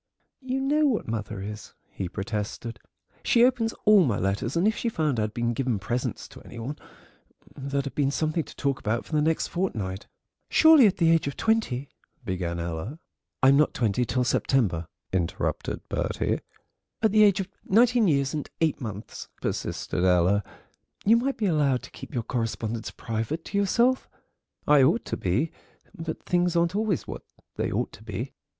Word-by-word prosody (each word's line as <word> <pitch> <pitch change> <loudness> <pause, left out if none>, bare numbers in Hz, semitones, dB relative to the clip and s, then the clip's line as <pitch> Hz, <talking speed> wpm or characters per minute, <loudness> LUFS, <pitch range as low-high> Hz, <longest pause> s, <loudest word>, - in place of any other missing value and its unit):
"You 260 0 -2
know 295 +3 +3
what 240 -6 0
mother 110 -3 -4
is," 105 +1 -8 0.2
he 95 - -4
protested; 105 +4 -4 0.4
"she 235 0 +5
opens 245 -3 +1
all 210 -3 +7
my 115 -9 +1
letters, 100 - -1
and 180 +5 +3
if 220 - +2
she 235 - -1
found 155 - 0
I'd 105 0 0
been 120 0 0
giving 125 -2 0
presents 120 +5 -3
to - - -13
any 120 - -12
one 125 +6 -4 0.8
there'd 140 0 -2
have 140 - -5
been 140 -2 +1
something 155 +3 0
to - - -13
talk 140 -2 -1
about 110 +2 -1
for - - -15
the 150 - +3
next 160 +1 +1
fortnight." 105 - -3 0.4
"Surely, 315 -7 +7
at 195 - 0
the 165 -2 +4
age 165 -3 +3
of 140 - -4
twenty—" 215 - 0 0.4
began 90 -2 -2
Ella. 85 - -4 0.5
"I'm 135 +1 +7
not 150 - +3
twenty 115 0 +1
till 125 +2 0
September," 105 -9 +1 0.3
interrupted 85 -3 -2
Bertie. - - -1 0.6
"At 220 - +4
the 215 +1 +5
age 200 -2 +5
of 190 - -2 0.2
nineteen 235 +1 +4
years 140 -4 +2
and 150 -2 -4
eight 160 -4 +1
months," 105 -3 -7
persisted 90 - -2
Ella, 90 +3 +3 0.6
"you 220 +3 +6
might 265 +4 0
be 220 - -1
allowed 145 -8 +2
to - - -11
keep - - -10
your 120 -5 -2
correspondence 115 -1 -3
private 115 +9 -4
to 200 - -3
yourself." 235 +6 +2 0.6
"I 150 -1 +6
ought 165 - +3
to - - -2
be, 120 - 0 0.4
but 165 -3 -5
things 175 -1 +1
aren't 170 +2 +2
always 210 -5 0
what - - -7 0.4
they - - -1
ought - - -1
to 110 - -14
be. 110 +4 -5
140 Hz, 175 wpm, -26 LUFS, -, 0.8 s, all